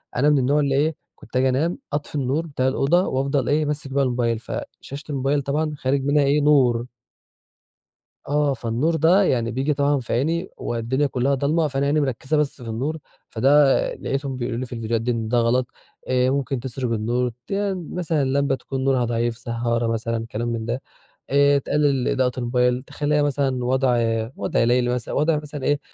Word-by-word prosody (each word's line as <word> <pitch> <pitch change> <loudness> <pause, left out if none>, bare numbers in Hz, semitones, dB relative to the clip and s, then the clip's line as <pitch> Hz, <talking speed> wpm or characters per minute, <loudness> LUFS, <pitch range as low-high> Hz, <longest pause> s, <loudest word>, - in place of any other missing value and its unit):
أنا 145 +4 +3
من 150 - +4
النوع 140 +4 +2
اللي 140 -2 +1
إيه 155 +3 +1 0.2
كنت - - -15
أجي 130 +1 +3
أنام 155 +7 0 0.2
أطفي 145 +1 -3
النور 145 +4 -1
بتاع 130 -4 -1
الأوضة، 160 +7 +2
وافضل 135 0 0
إيه 150 +1 +2
ماسك 145 -2 -3
بقى 140 0 +2
الموبايل، 120 -3 0
فشاشة 140 +4 -7
الموبايل 140 +1 0
طبعًا 150 +3 -1
خارج 135 +1 0
منها 145 +1 +3
إيه 145 +2 +3
نور 125 -5 +3 1.4
آه، 145 -1 +1
فالنور 125 +7 -1
ده 170 +6 +4
يعني 120 -7 +1
بييجي 135 +5 0
طبعًا 140 0 +1
في 120 - -4
عيني، 165 +9 0
والدنيا 120 +5 -1
كلّها 135 +2 0
ضالمة 150 +4 +1
فأنا 135 0 -1
عيني 150 +2 +2
مركّزة 135 +3 -1
بس 145 -3 -1
في 115 - -7
النور، 135 +8 -2 0.3
فده 135 +4 +4 0.2
لقيتهم 135 0 -3
بيقولوا 120 -1 -3
لي 130 - -3
في 120 - -10
الفيديوهات 115 -1 -1
دي 120 +2 0
إن 115 -2 -2
ده 120 +1 +1
غلط، 120 +2 +2 0.4
آآ، 125 0 +2
ممكن 135 -1 -1
تِسرج 130 -1 -4
النور 120 +3 0 0.2
تي 200 0 -1
مثلًا 165 -3 -2
لمبة 135 0 +1
تكون 130 0 -5
نورها 130 -3 +2
ضعيف 115 0 -1
سهّارة 115 0 -1
مثلًا 115 0 -2
كلام 120 +2 -2
من 115 -1 -2
ده، 120 +3 -3 0.5
آآ، 140 0 +4
تقلل 140 -2 +1
إضاءة 130 -1 +1
الموبايل 125 0 +1
تخلّيها 150 +2 0
مثلًا 135 -3 0
وضع 130 -1 +2 0.4
وضع - - 0
ليلي 125 +1 +2
مثلًا 125 -2 -4
وضع 155 +1 +2
مثلًا 150 -2 -6
إيه 145 0 +1
135 Hz, 185 wpm, -23 LUFS, 125-145 Hz, 1.4 s, من